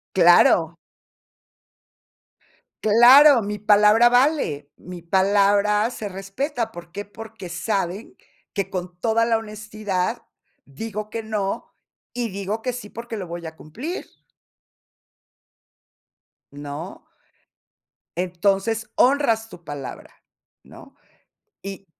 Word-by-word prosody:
¡Claro! 170 -2 +5 2.1
¡Claro!, 245 +5 +7
mi 210 0 -4
palabra 210 +3 +5
vale, 245 - +1
mi 180 0 -10
palabra 200 +4 +2
se 215 -4 -6
respeta, 225 +6 -4
¿por 170 -2 -12
qué?, 205 +2 -5
porque 210 -2 -10
saben 195 +2 -3 0.4
que 200 -3 -2
con 180 -1 -6
toda 230 0 +2
la 230 -1 +2
honestidad 215 -3 -4 0.4
digo 210 +9 -7
que 225 +1 -4
no 210 -3 -4 0.4
y 240 -1 -2
digo 200 +3 -4
que 250 - -2
sí, 240 -4 -8
porque 230 +1 -7
lo 190 -3 -6
voy 170 0 -7
a 160 0 -8
cumplir. 255 - -6 2.5
¿No? 145 +5 -8 1.2
Entonces, 195 +6 0
honras 240 -5 +2
tu 175 - -13
palabra, 145 -4 -8 0.5
¿no?, - - -15 0.7
y 195 0 -8
205 Hz, 100 wpm, -22 LUFS, 180-225 Hz, 2.5 s, Claro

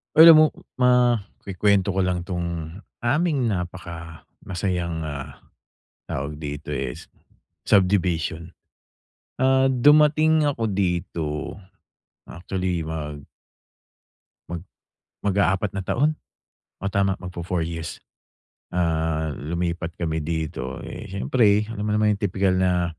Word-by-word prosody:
Uy, 160 - +10
alam 165 -1 +11
mo, 155 - +8 0.3
ma 125 -2 +4 0.2
kukuwento 100 +1 +2
ko 95 - -1
lang 90 -1 0
'tong 85 -1 -4 0.2
aming 140 0 +1
napaka 85 -3 -6 0.2
masayang, 90 -3 -2
ah, 70 -3 -7 0.7
tawag 70 +2 -3
dito, 75 0 -6
eh, 70 -3 -2
s - - -12 0.6
subdivision. 90 -4 +1 0.8
Ah, 130 +1 +4
dumating 150 +4 +5
ako 125 -5 -2
dito 90 -3 -2 0.7
actually, 90 -1 -3
mag 75 -2 -5 1.3
mag 85 -1 -5 0.6
mag-aapat 100 0 +1
na 95 - -2
taon. 145 +11 +1 0.7
Oh, 100 - -1
tama, 95 -1 +2
mag-fo 90 -2 -6
4 90 -1 -1
years. 80 0 -5 0.7
Ah, 80 -2 0
lumipat 85 +1 -3
kami 80 -2 -2
dito, 80 +1 -4
eh, - - -7
siyempre 105 - +2
alam 105 -2 -4
mo 105 - +1
naman 105 0 +3
yung 105 - 0
tipikal 95 +1 +1
na 90 -3 +1
90 Hz, 115 wpm, -24 LUFS, 80-105 Hz, 1.3 s, alam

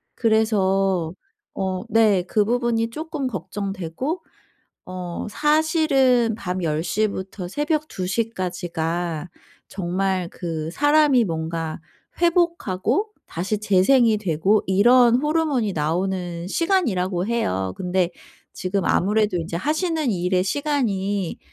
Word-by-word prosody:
그래서 195 -6 +1 0.4
어 190 -1 -2
네. 215 -4 +4
그 210 +3 +1
부분이 235 0 0
쪼끔 305 0 -4
걱정되고 200 - -4 0.6
어 180 -1 -5
사실은 295 -5 +3
밤 185 -3 -4
10 155 -1 0
시부터 195 -3 -2
새벽 300 - -1
2 185 - -4
시까지가 175 -5 -2 0.4
정말 185 0 -1
그 160 -3 -4
사람이 290 - +4
뭔가 160 -2 -3 0.4
회복하고 340 - +1 0.2
다시 195 +5 -2
재생이 215 +4 +4
되고 195 +2 +1
이런 240 +5 +5
호르몬이 295 -6 0
나오는 175 +2 -2
시간이라고 200 - 0
해요. 95 - -1
근데 180 -1 0 0.5
지금 185 +1 -2
아무래도 210 +1 +2
인제 165 0 -4
하시는 315 - 0
일의 180 -1 +1
시간이 205 - -1
200 Hz, 230 characters per minute, -22 LUFS, 180-255 Hz, 0.6 s, 이런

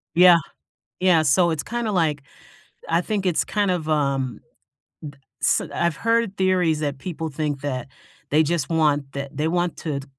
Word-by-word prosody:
Yeah. 180 0 +8 0.6
Yeah, 180 -4 +4
so 170 +4 +3
it's 160 -3 -2
kinda 235 -2 -3
like 160 -6 +1 0.7
I 165 +1 +2
think 200 +1 -2
it's 175 -3 +1
kind 205 -2 0
of, 165 -4 -2
um 140 -4 0
d - - -38 1.0
s - - +3
I've 170 -2 0
heard 230 -1 0
theories 180 -4 +2
that 145 -3 -3
people 165 0 -5
think 145 -1 -3
that 130 -3 -3 0.4
they 155 +2 +4
just 160 -2 -1
want 150 -4 +1
the 140 - -3
that 140 +1 -10
they 155 +1 0
wanted 165 -4 -2
160 Hz, 165 wpm, -23 LUFS, 145-180 Hz, 1.0 s, Yeah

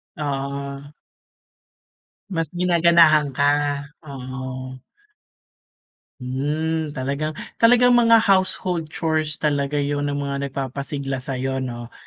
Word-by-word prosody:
Oo. 140 0 -4 1.4
Mas 165 -1 0
ginaganahan 170 -3 +4
ka? 140 +2 +1 0.6
Oo. 130 -2 -7 1.4
Hmm, 150 +5 -2
talagang, 140 +4 -3 0.2
talagang 245 +1 +6
mga 230 -1 +6
household 185 -5 +1
chores 155 -1 -1
talaga 145 -1 0
yun 145 0 -1
ng 145 - -2
mga 140 -1 -3
nagpapasigla 135 0 -4
sa’yo, 130 0 -3
‘no. 120 -2 -6
145 Hz, 90 wpm, -22 LUFS, 135-160 Hz, 1.4 s, talagang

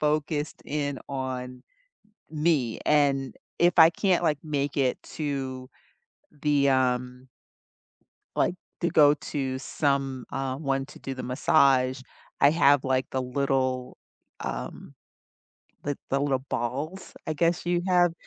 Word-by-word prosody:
focused 150 0 -1
in 145 -2 -2
on 130 -2 -4 0.7
m 150 -1 -4
me, 135 -9 +2
and 140 -3 +2 0.3
if 175 0 +4
I 160 0 +10
can't, 180 +1 +1
like, 150 -3 +2
make 145 -2 -2
it 130 -2 +1 0.2
to 135 -4 -3 0.7
the, 145 -2 +3
um 125 -1 0 1.1
like, - - +1 0.3
to 175 - +2
go 150 -3 +6
to 135 -3 -3
some, 135 -2 -1
um - - -3
I 135 -1 -2
wanted 135 -1 -2
to - - -13
do 135 - -5
the 130 - -6
massage, 130 -1 +3 0.4
I 140 +1 +7
have, 145 -4 +4
like, 130 -1 0
the 130 - -1
little, 130 -1 -1 0.4
um, - - -6 0.9
the 145 -1 -2
the 135 +1 +1
little 135 -2 +1
balls, 140 +10 -3
I 155 - -1
guess, 170 +3 +1
you 175 0 +1
have, 175 -2 +4
140 Hz, 135 wpm, -27 LUFS, 130-150 Hz, 1.1 s, I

